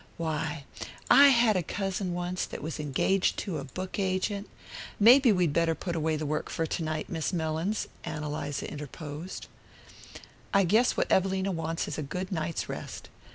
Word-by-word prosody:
Why, 155 -2 -2 0.5
I 280 +1 +9
had 235 -5 +5
a 185 - +2
cousin 190 0 -2
once 175 +1 -2
that - - -7
was 155 0 -4
engaged 150 +6 +1
to 170 -6 -3
a - - -5
book 185 +9 -5
agent 195 +2 -1 0.3
" - - -11
"Maybe 245 +4 +8
we'd 180 -6 +2
better 165 0 +2
put 175 0 -4
away 160 -1 0
the 155 0 -3
work 150 +1 -2
for 165 - -1
to 165 - -2
night, 155 -1 -2
Miss 165 -1 -2
Mellins," 165 +4 -1 0.2
Ann 150 -1 -4
Eliza 145 -1 -3
interposed. 150 +3 -7 1.1
"I 200 - +6
guess 220 +8 +3
what - - 0
Evelina 190 +1 +2
wants 165 -1 -2
is - - -4
a - - -1
good 180 +7 -4
night's 165 -2 -2
rest." - - -7
170 Hz, 175 wpm, -29 LUFS, 155-190 Hz, 1.1 s, I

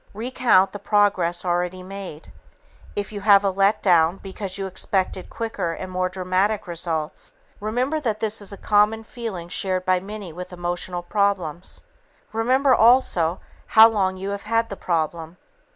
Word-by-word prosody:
Recount 230 -4 +2
the 205 - -7
progress 190 -4 +1
already 180 +1 -1
made. 185 -5 -9 0.6
If 205 0 -3
you 205 -1 -6
have 200 -1 +6
a 195 - +2
"let 195 +2 +2
down" 175 -1 +4
because 195 0 -6
you 195 - -3
expected 190 0 -2
quicker 225 -7 -3
and 185 +2 -7
more 185 0 -1
dramatic 190 +3 0
results, 165 -3 -4 0.3
remember 250 +9 -1
that 225 -7 -2
this 220 -1 -1
is 205 - -7
a 200 - -8
common 210 +2 +2
feeling 220 -7 -6
shared 185 0 -2
by 185 0 +3
many 200 -2 -8
with 180 +2 -8
emotional 175 0 -4
problems. 185 -3 -1 0.5
Remember, 255 +4 +3
also, 220 -9 +3 0.4
how 220 +1 +10
long 190 -4 0
you 195 +2 -4
have 200 0 -4
had 230 0 +1
the 200 - -5
problem. 165 -1 -2
195 Hz, 155 wpm, -23 LUFS, 180-215 Hz, 0.6 s, how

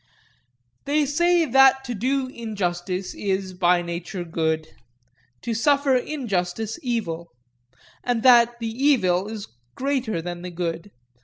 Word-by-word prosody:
They 295 +1 +2
say 345 +4 +3
that 270 0 +5
to 245 -2 -4
do 260 +5 0
injustice 190 -6 -3
is, 190 -2 -2
by 180 -1 +2
nature, 175 +2 -5
good; 160 -2 -1 0.8
to 235 - -2
suffer 280 +3 +3
injustice, 225 - -2
evil; 175 - -3 0.7
but 240 -2 -1
that 240 -2 +6
the 225 -1 -3
evil 190 -9 +3
is 215 -2 -6 0.3
greater 260 -8 -1
than 175 +1 -6
the 180 - -6
good. 170 +2 -4
220 Hz, 125 wpm, -23 LUFS, 180-260 Hz, 0.8 s, that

